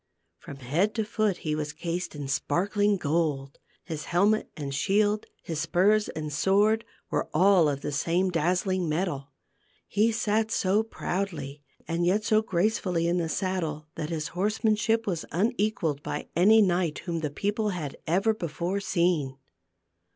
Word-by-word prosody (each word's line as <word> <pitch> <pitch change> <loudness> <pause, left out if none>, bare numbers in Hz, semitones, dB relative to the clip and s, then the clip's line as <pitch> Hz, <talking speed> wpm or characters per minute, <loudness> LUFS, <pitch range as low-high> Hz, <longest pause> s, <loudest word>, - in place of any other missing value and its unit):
From 140 - -9
head 150 +11 0
to 220 -2 0
foot 215 -3 0
he 155 - 0
was 150 -1 -3
cased 170 +2 -4
in 145 -2 -5
sparkling 200 +9 +1
gold: 145 -4 -1 0.2
his 160 -4 -5
helmet 205 +5 +2
and 140 -2 -4
shield, 205 +7 +1 0.2
his 160 -3 -4
spurs 190 +6 +2
and 155 -2 -5
sword 205 +7 +3 0.3
were - - -1
all 180 -2 +5
of 140 -1 -3
the 145 - -3
same 175 +6 +1
dazzling 180 +1 0
metal. 150 -4 -2 0.6
He 215 +3 +2
sat 220 0 0
so 205 -2 +2
proudly 170 -10 -4 0.3
and 165 +1 -1
yet 195 +5 +2
so 215 0 +3
gracefully 185 -3 0
in 175 +1 +1
the 165 -2 -1
saddle 160 -5 -2
that 155 -3 -4
his 160 -2 -3
horsemanship 215 +3 +1
was 175 -5 -2
unequalled 205 - 0
by - - -5
any 210 +6 +6
knight 175 -4 +1
whom 170 -2 -2
the 155 -2 -2
people 205 +8 -1
had 160 -8 -4
ever 195 +7 +2
before 175 0 -3
seen. 170 -8 0
180 Hz, 150 wpm, -27 LUFS, 155-205 Hz, 0.6 s, any